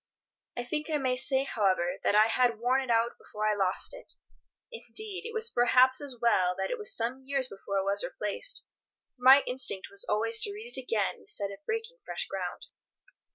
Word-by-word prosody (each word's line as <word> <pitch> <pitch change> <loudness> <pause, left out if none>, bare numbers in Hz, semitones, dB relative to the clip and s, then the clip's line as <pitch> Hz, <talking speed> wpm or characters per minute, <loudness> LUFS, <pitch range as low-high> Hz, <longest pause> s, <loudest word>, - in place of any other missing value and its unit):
I 245 - -2
think 300 +5 -3
I 305 - +1
may 260 -3 0
say, 265 +1 +3
however, 190 -8 0
that - - +2
I 215 +1 +7
had 235 0 +2
worn 250 +4 +1
it 260 - -7
out 230 0 +1
before 215 0 -4
I 215 - +3
lost 190 -2 -1
it. - - -5 0.6
Indeed, 435 -3 -6
it - - -7
was 450 0 -1
perhaps 255 +2 +4
as 275 -4 -4
well 185 -6 +2
that - - -3
it - - -3
was 420 - +2
some 240 +3 -2
years 270 -1 0
before 195 -2 -5
it 195 - +1
was 200 +1 +2
replaced, 210 - -3 0.5
for 250 - -30
my 265 +2 +8
instinct 250 -7 +2
was 200 0 +1
always 225 +2 +2
to 410 - -1
read 445 +4 -9
it - - -5
again 225 -5 -1
instead 200 -1 -4
of 200 - -11
breaking 455 +2 -3
fresh - - -3
ground. - - -5
250 Hz, 200 wpm, -29 LUFS, 210-285 Hz, 0.6 s, my